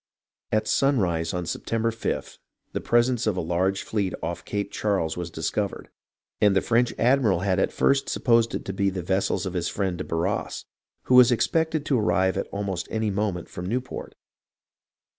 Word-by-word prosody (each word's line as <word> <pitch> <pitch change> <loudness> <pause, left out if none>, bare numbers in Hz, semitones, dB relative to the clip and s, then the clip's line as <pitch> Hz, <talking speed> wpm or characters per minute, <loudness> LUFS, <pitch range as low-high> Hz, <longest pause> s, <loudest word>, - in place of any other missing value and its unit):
At 110 - +1
sunrise 90 - +1
on 90 -1 -3
September 115 +6 -1
5th, 115 - -4 0.3
the - - -2
presence 120 -1 +2
of 100 -4 +1
a - - 0
large 90 +3 0
fleet 100 -4 -1
off - - -3
Cape 100 -1 -3
Charles 100 -7 0
was 90 -1 -4
discovered, - - -3 0.5
and 105 -2 +5
the 95 - +4
French 120 0 +2
admiral 115 -8 +3
at 95 -1 +1
first 140 0 +2
supposed 115 -1 +2
it - - -5
to 95 - -4
be 100 +1 +1
the 95 -2 -4
vessels 95 +1 0
of 95 - -4
his 90 -2 -1
friend 95 -3 -2
de - - -2
Barras, 80 +1 -2 0.4
who - - 0
was 125 -1 +8
expected 160 +4 +1
to 135 -6 +2
arrive 95 -1 +2
at - - -2
almost 100 -3 -3
any 110 -1 -1
moment 95 -3 -2
from 90 +1 -6
Newport. 125 +4 -4
100 Hz, 175 wpm, -25 LUFS, 90-115 Hz, 0.5 s, was